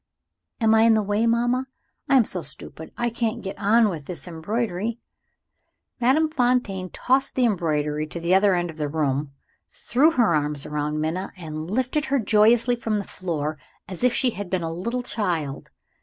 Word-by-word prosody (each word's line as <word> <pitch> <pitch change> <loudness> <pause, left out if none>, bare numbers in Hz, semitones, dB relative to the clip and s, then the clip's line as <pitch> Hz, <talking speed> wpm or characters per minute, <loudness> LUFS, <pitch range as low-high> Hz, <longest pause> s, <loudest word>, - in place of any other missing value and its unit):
"Am 225 -2 +4
I 220 - +5
in 225 0 +5
the 215 - +1
way, 205 +3 +1
mamma? 240 +3 +1 0.4
I 275 - +6
am 240 - +5
so 180 - +1
stupid, 160 -1 -9
I 240 0 0
can't 230 -1 -2
get 195 0 -5
on 220 +2 +4
with 160 -8 -5
this 180 0 -4
embroidery 210 +5 -3 0.6
" - - -43
Madame 275 +7 +3
Fontaine 245 - 0
tossed 265 +7 +1
the 255 - +3
embroidery 155 -7 0
to 170 - -7
the 170 +2 +1
other 195 0 +4
end 175 -1 -1
of 160 - -16
the 150 -2 -2
room, 145 -2 -1 0.4
threw 280 +6 +2
her 240 - +2
arms 150 -2 0
round 150 0 -2
Minna, 165 +5 -2
and 155 -1 -6
lifted 260 +7 0
her 275 +1 +1
joyously 230 +1 +4
from 225 -2 -2
the 205 - -2
floor 155 -6 -4 0.3
as 185 +4 -6
if 250 - +5
she 250 +1 +1
had 205 -4 -6
been 185 -2 -1
a 165 0 -3
little 235 +9 -3
child. 170 - -2
200 Hz, 185 wpm, -24 LUFS, 160-235 Hz, 0.6 s, I